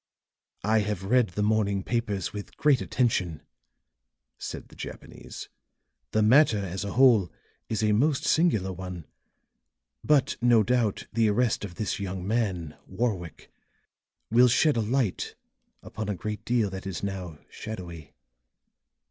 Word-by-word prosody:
"I 110 +3 +3
have 105 -2 -2
read 120 +4 +3
the 105 +4 -2
morning 105 -2 +1
papers 105 -6 -2
with 105 -1 -8
great 145 -4 +3
attention," 95 - 0 1.0
said - - -7
the - - -16
Japanese. - - -9 0.6
"The 110 - +2
matter 120 +1 +5
as 95 0 -4
a 100 - -4
whole 120 -8 +5 0.4
is 110 -1 -1
a 105 - +3
most 135 +7 +2
singular 110 - +2
one. 90 -3 -7 1.0
But, 145 -2 +2
no 120 -2 +5
doubt, 115 -2 0
the 115 -1 +3
arrest 115 +1 +1
of 95 -4 -7
this 105 +2 -2
young 95 -1 -4
man, 95 -9 -1
Warwick, 95 -5 -3 0.8
will 120 +2 +6
shed 145 +5 +3
a 115 - +1
light 115 -2 -1 0.5
upon 110 -1 -6
a 105 - -1
great 105 +4 -5
deal 120 -5 +1
that 95 0 -6
is 95 0 -5
now 95 -5 -4
shadowy." 85 -8 -8
105 Hz, 140 wpm, -27 LUFS, 95-120 Hz, 1.0 s, will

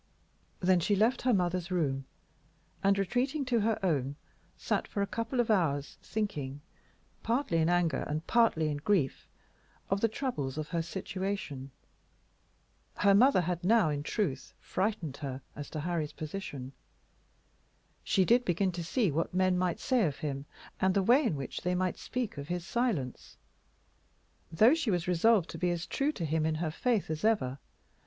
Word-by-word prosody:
Then 185 0 +4
she 205 +5 +2
left 225 +6 +2
her 255 - +2
mother's 180 -3 0
room, 140 -7 0 0.8
and, 195 0 +4
retreating 255 - 0
to 245 -2 +2
her 220 +1 +1
own, 140 -5 0 0.4
sat - - -1
for 200 - -1
a - - +1
couple 230 +4 -3
of 235 -2 +2
hours 145 -8 0
thinking, 150 -11 -3 0.6
partly 230 -7 0
in 160 +1 +2
anger 175 -5 +2
and 155 +2 -3
partly 220 -10 +3
in 145 - -2
grief, 155 -3 0 0.6
of 195 0 +1
the 230 - +4
troubles 210 - -3
of 155 -1 -4
her 170 -1 0
situation. 185 -5 -4 1.3
Her 200 0 +4
mother 240 0 +5
had 175 0 -2
now, 210 -3 +4
in 145 -1 -2
truth, 150 - -2
frightened 185 -8 -2
her 135 -2 -5
as 145 -1 -7
to 155 - -4
Harry's 165 -2 -2
position. 145 -5 -6 1.3
She 190 - +2
did 245 +4 +4
begin 185 0 +1
to 175 -1 -5
see 200 - +1
what 165 +4 -2
men 185 0 +3
might 180 -1 0
say 245 -8 +2
of 145 - -4
him, 140 -2 -4 0.3
and 190 0 +2
the 200 - +3
way 250 +9 +5
in 225 - +1
which 140 -2 -5
they 180 0 0
might 185 0 -1
speak 245 - -3
of 140 - -6
his 175 0 -3
silence, 190 - -2 1.1
though 220 - +6
she 325 -7 0
was 175 -3 0
resolved 180 +1 +4
to - - -7
be 180 - +1
as 175 -1 -2
true 280 +2 0
to 170 - -3
him 155 +1 0
in 155 0 +1
her 160 0 -2
faith 220 -1 0
as 155 +3 -4
ever. 200 - +1
180 Hz, 170 wpm, -31 LUFS, 155-215 Hz, 1.3 s, though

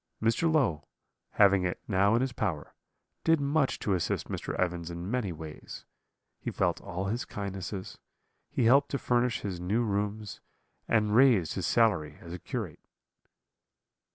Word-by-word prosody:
Mr. 115 +9 +2
Low, 120 - +1 0.5
having 100 -2 +5
it 90 0 -2
now 100 +1 +3
in 120 - +2
his 130 -2 -1
power, 80 -10 -3 0.5
did 165 -1 +4
much 140 0 +1
to 100 - -1
assist 90 -3 -1
Mr. - - -4
Evans 85 -2 -1
in 85 +3 -5
many 125 -7 -1
ways; 80 -1 -9 0.5
he - - -4
felt - - 0
all 90 +2 -4
his 115 +6 -1
kindnesses; 95 -4 -6 0.5
he - - 0
helped 140 +5 +5
to 140 - -1
furnish 120 -2 +1
his 95 -4 -4
new 100 +7 0
rooms, 105 0 -2 0.5
and 105 -2 +2
raised 120 - +5
his - - -2
salary 105 -10 +2
as 85 0 -9
a 90 - -6
curate. - - -5
105 Hz, 155 wpm, -29 LUFS, 90-120 Hz, 0.5 s, having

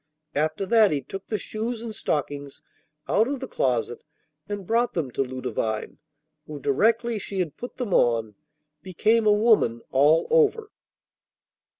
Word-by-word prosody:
After 155 +6 -1
that 220 +1 +5
he 145 -4 -1
took 195 +8 -8
the 215 - -1
shoes 225 +3 -4
and 225 -2 -6
stockings 145 -6 -3 0.4
out 220 +3 +3
of 275 0 -3
the 265 - -6
closet 120 - -1 0.5
and 205 -2 -4
brought 235 +4 +1
them 150 -7 -2
to - - -1
Ludovine, 125 -4 -3 0.5
who, 150 -1 -7
directly 225 - +1
she 195 - -6
had 165 -5 -2
put 245 - -8
them 240 -7 -3
on, 115 -3 +2 0.5
became 215 +6 +1
a - - +6
woman 210 - +3
all 145 +5 +4
over. 450 -2 +3
195 Hz, 150 wpm, -25 LUFS, 140-230 Hz, 0.5 s, a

